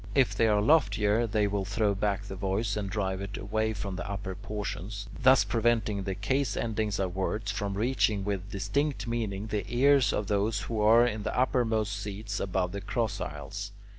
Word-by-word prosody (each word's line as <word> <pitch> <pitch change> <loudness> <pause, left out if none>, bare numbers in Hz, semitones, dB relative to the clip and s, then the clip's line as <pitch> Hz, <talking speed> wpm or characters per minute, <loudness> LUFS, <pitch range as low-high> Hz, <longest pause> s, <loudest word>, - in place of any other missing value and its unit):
If 135 -3 +4
they 115 - +3
are 105 -1 +3
loftier, 110 -5 +3
they 105 -1 +1
will 100 -1 -1
throw 105 +1 +1
back 100 0 -1
the 100 -1 -7
voice 100 +2 -1
and 105 -2 -3
drive 95 -1 -2
it 100 0 -5
away 110 +2 -1
from 95 -2 -5
the 85 - -5
upper 95 -1 -4
portion, 100 0 -5 0.3
thus 130 +1 +6
preventing 115 -3 +1
the 95 -1 -3
case 130 +3 0
endings 110 -3 -1
of 95 -2 -2
words 105 +3 -1
from 100 -2 -3
reaching 110 -3 +1
with 100 -1 -3
distinct 130 +10 -1
meaning 110 -4 -2
the 105 -2 -2
ears 135 +2 +4
of 105 - -1
those 105 +1 0
who 110 0 -2
are 115 +3 +6
in 110 -3 -2
the 105 - -3
uppermost 115 -5 +1
seats 105 0 -5
above 95 -2 -1
the 100 +1 -5
cross 105 -1 -2
aisles. 100 +8 -6
105 Hz, 190 wpm, -29 LUFS, 100-115 Hz, 0.3 s, thus